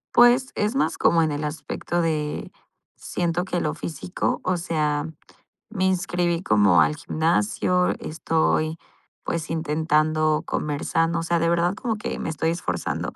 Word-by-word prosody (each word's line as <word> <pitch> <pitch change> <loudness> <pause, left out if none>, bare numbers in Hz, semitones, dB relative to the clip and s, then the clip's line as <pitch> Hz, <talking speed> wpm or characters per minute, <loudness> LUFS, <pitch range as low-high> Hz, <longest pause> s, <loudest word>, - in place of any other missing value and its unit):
Pues, 245 +2 +5
es 210 +5 -1
más, 275 - 0
como 165 -1 +4
en 155 - 0
el 145 +1 -3
aspecto 160 +3 -3
de 150 -2 -2 0.4
siento 175 +1 -2
que 180 -2 -1
lo 150 -1 -1
físico. 165 +2 -3
O 185 -1 0
sea, 155 -3 -1 0.6
me 190 -4 -1
inscribí 175 -2 0
como 105 - +4
al 150 - +2
gimnasio, 160 - +1
estoy, 160 0 0 0.4
pues, 165 -1 -3
intentando 155 0 +1
comenzando, 165 +3 -1
o - - -3
sea, 170 +1 +1
de 165 0 +1
verdad 170 +3 +2
como 225 -2 -2
que - - -4
me - - -4
estoy 160 +1 -1
esforzando. 90 - -3
165 Hz, 145 wpm, -24 LUFS, 155-175 Hz, 0.6 s, Pues